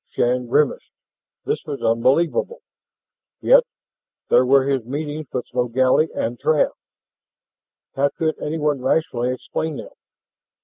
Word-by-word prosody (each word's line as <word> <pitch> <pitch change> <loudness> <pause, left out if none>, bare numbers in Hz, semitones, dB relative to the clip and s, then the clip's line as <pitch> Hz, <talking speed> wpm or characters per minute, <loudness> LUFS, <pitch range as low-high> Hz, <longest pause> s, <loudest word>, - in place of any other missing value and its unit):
Shann 125 0 0
grimaced. 145 +4 +1 0.6
This - - -2
was 145 -2 -5
unbelievable. 145 - +1 0.8
Yet - - +6 0.7
there 125 - +4
were 135 +1 +5
his 135 -2 0
meetings 145 +4 -5
with 125 - -3
Logally 130 +5 +2
and 120 +1 -3
Trav. 155 -2 +2 1.2
How 140 +1 +2
could 160 +2 -1
anyone 150 -3 -1
rationally 125 -3 0
explain 150 +4 -4
them? - - -9
140 Hz, 115 wpm, -21 LUFS, 125-155 Hz, 1.2 s, Yet